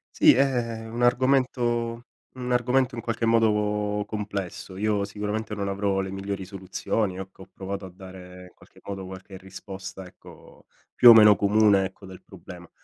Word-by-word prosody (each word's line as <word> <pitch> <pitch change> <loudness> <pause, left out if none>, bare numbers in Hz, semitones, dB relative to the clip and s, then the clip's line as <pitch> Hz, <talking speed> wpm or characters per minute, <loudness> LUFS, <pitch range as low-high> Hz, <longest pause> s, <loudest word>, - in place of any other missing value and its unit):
Sì, - - +6
è 120 -4 -1
un 120 +2 -4
argomento 120 -2 +1 0.3
un 125 -1 -5
argomento 125 +1 +1
in 115 - -5
qualche 115 0 -2
modo 105 -2 +1
complesso. 100 -3 -6
Io 105 0 0
sicuramente 105 +1 -4
non 100 -1 -3
avrò 100 0 -1
le 95 0 -3
migliori 95 0 -5
soluzioni, 95 +1 -3
ecco 95 0 -10
ho - - -19
provato 95 0 -6
a - - -9
dare 90 -1 -12
in - - -28
qualche - - -21
modo 95 -1 -6
qualche 95 +1 -10
risposta 95 0 -9
ecco, 90 - -17 0.3
più 120 - +8
o - - +12
meno 105 -2 +7
comune 100 -1 +3
ecco, 95 +1 -10
del 95 -1 -12
problema, 90 -1 -13
105 Hz, 165 wpm, -25 LUFS, 95-115 Hz, 0.3 s, o